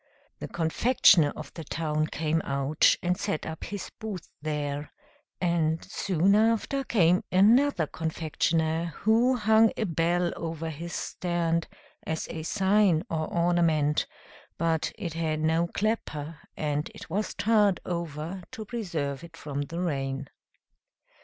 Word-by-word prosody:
The -, -, -5 dB
confectioner 170 Hz, -, +4 dB
of 155 Hz, -2 st, -9 dB
the 165 Hz, -, -7 dB
town 155 Hz, 0 st, -1 dB
came 160 Hz, +1 st, -1 dB
out, 140 Hz, +1 st, +2 dB
and 180 Hz, 0 st, +2 dB
set 155 Hz, -, -3 dB
up 160 Hz, 0 st, -6 dB
his 200 Hz, -2 st, -6 dB
booth 210 Hz, -6 st, -6 dB
there; 145 Hz, -1 st, -3 dB, 0.5 s
and 165 Hz, -2 st, +1 dB
soon 190 Hz, -1 st, +1 dB
after 225 Hz, +5 st, +2 dB
came 180 Hz, -7 st, +3 dB
another 215 Hz, -, +4 dB
confectioner, 160 Hz, +1 st, -1 dB
who 235 Hz, +4 st, +4 dB
hung 220 Hz, -1 st, +4 dB
a -, -, 0 dB
bell 175 Hz, -1 st, +1 dB
over 165 Hz, -1 st, -4 dB
his 170 Hz, +3 st, -7 dB
stand, 170 Hz, -2 st, -1 dB, 0.3 s
as 160 Hz, 0 st, -3 dB
a 160 Hz, -, -5 dB
sign 190 Hz, -1 st, +3 dB
or 155 Hz, -1 st, -2 dB
ornament, 165 Hz, -4 st, +2 dB, 0.5 s
but 165 Hz, -1 st, 0 dB
it 175 Hz, -7 st, -4 dB
had 160 Hz, -2 st, -1 dB
no 160 Hz, +2 st, +2 dB
clapper, 165 Hz, -7 st, -2 dB, 0.2 s
and 150 Hz, 0 st, -1 dB
it -, -, -10 dB
was 210 Hz, +4 st, -2 dB
tarred 210 Hz, -3 st, +3 dB
over 170 Hz, +1 st, -4 dB
to 220 Hz, -, -6 dB
preserve 170 Hz, -, -3 dB
it 165 Hz, -1 st, -12 dB
from 145 Hz, -3 st, -4 dB
the 165 Hz, +4 st, -5 dB
rain. 135 Hz, -5 st, -2 dB
165 Hz, 135 wpm, -27 LUFS, 155-195 Hz, 0.5 s, confectioner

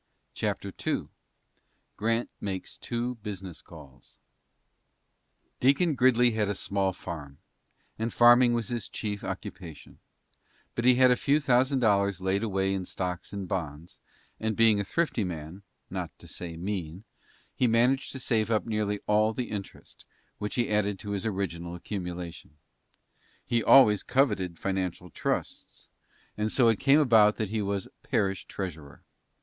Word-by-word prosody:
CHAPTER -, -, -3 dB
II -, -, -1 dB, 0.9 s
GRANT 115 Hz, +3 st, 0 dB
MAKES 95 Hz, -2 st, -5 dB
TWO 120 Hz, +1 st, -3 dB
BUSINESS 95 Hz, -4 st, -7 dB
CALLS 75 Hz, -6 st, -15 dB, 1.4 s
Deacon 140 Hz, +6 st, +3 dB
Gridley 125 Hz, -2 st, +4 dB
had 110 Hz, -2 st, 0 dB
a 105 Hz, -, -1 dB
small 95 Hz, 0 st, 0 dB
farm, 75 Hz, -6 st, -8 dB, 0.6 s
and 115 Hz, +1 st, -1 dB
farming 120 Hz, 0 st, +6 dB
was 115 Hz, -3 st, -2 dB
his 120 Hz, -2 st, -4 dB
chief 105 Hz, -2 st, -4 dB
occupation, 85 Hz, -5 st, -8 dB, 0.7 s
but 120 Hz, -, -2 dB
he 125 Hz, 0 st, +7 dB
had 130 Hz, 0 st, +6 dB
a -, -, +5 dB
few 140 Hz, +4 st, +2 dB
thousand 130 Hz, -1 st, +2 dB
dollars 100 Hz, -4 st, +2 dB
laid 95 Hz, +1 st, 0 dB
away 95 Hz, -3 st, 0 dB
in 95 Hz, -1 st, -2 dB
stocks 90 Hz, -1 st, -4 dB
and 100 Hz, -2 st, -5 dB
bonds, 80 Hz, -3 st, -5 dB, 0.4 s
and, 110 Hz, -1 st, -1 dB
being 110 Hz, -2 st, +4 dB
a -, -, 0 dB
thrifty 150 Hz, -, 0 dB
man, 85 Hz, +1 st, -6 dB, 0.3 s
not -, -, -5 dB
to -, -, -14 dB
say 85 Hz, -2 st, -7 dB
mean, 90 Hz, -1 st, -4 dB, 0.5 s
he 125 Hz, -, +2 dB
managed 125 Hz, +4 st, +2 dB
to 135 Hz, -, -6 dB
save 110 Hz, -4 st, 0 dB
up 110 Hz, -2 st, +1 dB
nearly 105 Hz, -2 st, -1 dB
all 105 Hz, +1 st, +2 dB
the 125 Hz, -, -4 dB
interest, 100 Hz, -2 st, -8 dB, 0.3 s
which 105 Hz, -, -3 dB
he 120 Hz, -3 st, 0 dB
added 105 Hz, -1 st, +1 dB
to 100 Hz, +2 st, -7 dB
his 100 Hz, +1 st, -2 dB
original 85 Hz, -4 st, -3 dB
accumulation. 90 Hz, -4 st, -6 dB, 0.9 s
He 115 Hz, -1 st, +1 dB
always 105 Hz, -7 st, +7 dB
coveted 125 Hz, -10 st, +1 dB
financial 90 Hz, -2 st, -3 dB
trusts, -, -, -4 dB, 0.5 s
and 105 Hz, +1 st, 0 dB
so 120 Hz, -3 st, +4 dB
it 115 Hz, -, +1 dB
came 140 Hz, +2 st, +5 dB
about 110 Hz, -7 st, +5 dB
that 110 Hz, -3 st, -2 dB
he 110 Hz, 0 st, -1 dB
was 100 Hz, -1 st, -2 dB
parish 95 Hz, -2 st, -1 dB
treasurer. 80 Hz, -7 st, -7 dB
105 Hz, 145 wpm, -28 LUFS, 95-120 Hz, 1.4 s, he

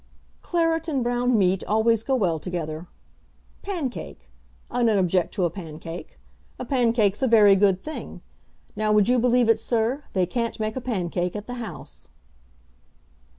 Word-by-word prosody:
"Claret 330 Hz, -1 st, 0 dB
and 275 Hz, -6 st, 0 dB
brown 245 Hz, 0 st, +1 dB
meat 190 Hz, -1 st, +2 dB
always 220 Hz, +1 st, +2 dB
go 265 Hz, +3 st, 0 dB
well 175 Hz, -9 st, +1 dB
together. 165 Hz, -1 st, -5 dB, 0.7 s
Pancake! 275 Hz, -, -5 dB, 0.4 s
I 245 Hz, -, -1 dB
don't 225 Hz, -3 st, +3 dB
object 180 Hz, -1 st, +1 dB
to 185 Hz, -, +1 dB
a 170 Hz, -, 0 dB
pancake. 165 Hz, -1 st, -9 dB, 0.4 s
A 250 Hz, -, -5 dB
pancake's 230 Hz, -5 st, +1 dB
a 265 Hz, -, +3 dB
very 210 Hz, -4 st, +6 dB
good 195 Hz, -1 st, +3 dB
thing. 310 Hz, +7 st, -8 dB, 0.5 s
Now 215 Hz, 0 st, 0 dB
would 210 Hz, -2 st, +4 dB
you 250 Hz, 0 st, +3 dB
believe 245 Hz, 0 st, +3 dB
it, 225 Hz, -, +4 dB
sir; 240 Hz, +5 st, -1 dB
they 185 Hz, -2 st, +2 dB
can't 230 Hz, +5 st, -3 dB
make 215 Hz, 0 st, -2 dB
a 260 Hz, -, -3 dB
pancake 180 Hz, -6 st, -2 dB
at 210 Hz, 0 st, -5 dB
the 245 Hz, -, -6 dB
House." 225 Hz, -, -9 dB
220 Hz, 155 wpm, -24 LUFS, 185-245 Hz, 0.7 s, very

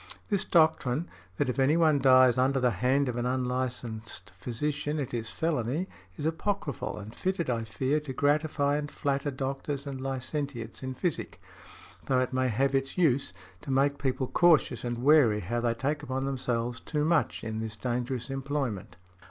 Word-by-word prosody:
This 200 Hz, -2 st, +1 dB
doctrine, 160 Hz, -2 st, +3 dB, 0.3 s
that 145 Hz, -, +1 dB
if 125 Hz, +2 st, -2 dB
any 140 Hz, +5 st, +4 dB
one 155 Hz, -4 st, +4 dB
dies 130 Hz, -2 st, +6 dB
under 135 Hz, +2 st, +2 dB
the 125 Hz, -1 st, +3 dB
hand 130 Hz, +7 st, +2 dB
of 120 Hz, -1 st, -2 dB
an 120 Hz, 0 st, 0 dB
unlicensed 125 Hz, -5 st, -3 dB
physician, 145 Hz, -, -2 dB
it 135 Hz, -4 st, -4 dB
is 115 Hz, -2 st, -2 dB
felony, 155 Hz, +1 st, -1 dB, 0.3 s
is 150 Hz, -, -4 dB
apochryphal 160 Hz, -, -2 dB
and 105 Hz, +2 st, -8 dB
fitted, 180 Hz, -5 st, -1 dB
I 115 Hz, -1 st, -1 dB
fear, 130 Hz, +6 st, 0 dB
to 150 Hz, -3 st, -7 dB
gratify 145 Hz, +1 st, +1 dB
and 150 Hz, 0 st, -3 dB
flatter 140 Hz, 0 st, -1 dB
doctors 135 Hz, +1 st, -3 dB
and 135 Hz, -2 st, -5 dB
licentiates 135 Hz, -2 st, -4 dB
in 130 Hz, -1 st, -4 dB
physic; 170 Hz, +3 st, -3 dB, 0.7 s
though 130 Hz, -1 st, +3 dB
it 130 Hz, 0 st, -1 dB
may 130 Hz, 0 st, +2 dB
have 135 Hz, +4 st, +1 dB
its 135 Hz, +3 st, -1 dB
use, 140 Hz, -7 st, +2 dB, 0.3 s
to -, -, -9 dB
make 140 Hz, +2 st, +2 dB
people 130 Hz, -1 st, 0 dB
cautious 155 Hz, -5 st, +3 dB
and 120 Hz, 0 st, -3 dB
wary 135 Hz, -8 st, +5 dB
how 120 Hz, +7 st, -2 dB
they 115 Hz, -1 st, +1 dB
take 145 Hz, +5 st, -1 dB
upon 135 Hz, -2 st, -3 dB
themselves 120 Hz, -3 st, -2 dB
too 150 Hz, -1 st, -1 dB
much, 165 Hz, -1 st, +1 dB
in 110 Hz, -1 st, -3 dB
this 110 Hz, -1 st, -4 dB
dangerous 125 Hz, +2 st, -2 dB
employment." 135 Hz, -7 st, -3 dB
135 Hz, 170 wpm, -29 LUFS, 120-145 Hz, 0.7 s, dies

